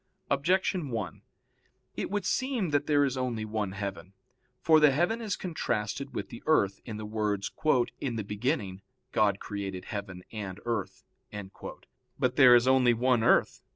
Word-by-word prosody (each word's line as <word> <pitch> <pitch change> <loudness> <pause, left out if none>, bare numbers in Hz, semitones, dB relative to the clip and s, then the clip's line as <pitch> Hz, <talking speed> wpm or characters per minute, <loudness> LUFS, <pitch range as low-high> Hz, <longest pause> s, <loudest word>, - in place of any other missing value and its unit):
Objection 175 +2 +1
1: 105 -9 -4 0.7
It - - -3
would 205 -1 -2
seem 255 - 0
that 145 0 +1
there 145 -1 +4
is 135 -1 -1
only 120 -4 -2
one 105 -3 -3
heaven. 100 -2 -6 0.5
For 160 -1 +5
the 150 -1 +7
heaven 175 - +1
is 210 -4 -2
contrasted 140 - -3
with - - -4
the 115 - -9
earth, 100 -11 +2
in 110 -3 -6
the 110 - -6
words, 105 -2 -2 0.5
"In 125 -4 -3
the 110 - -2
beginning 105 - -2 0.3
God 100 -2 +2
created 100 -3 -5
heaven 95 -3 -6
and 100 -3 -6
earth." 100 -5 -3 1.1
But - - 0
there 125 -2 +8
is 120 +1 +4
only 130 -2 +5
one 125 0 +2
earth. 120 - +3
115 Hz, 155 wpm, -29 LUFS, 100-145 Hz, 1.1 s, there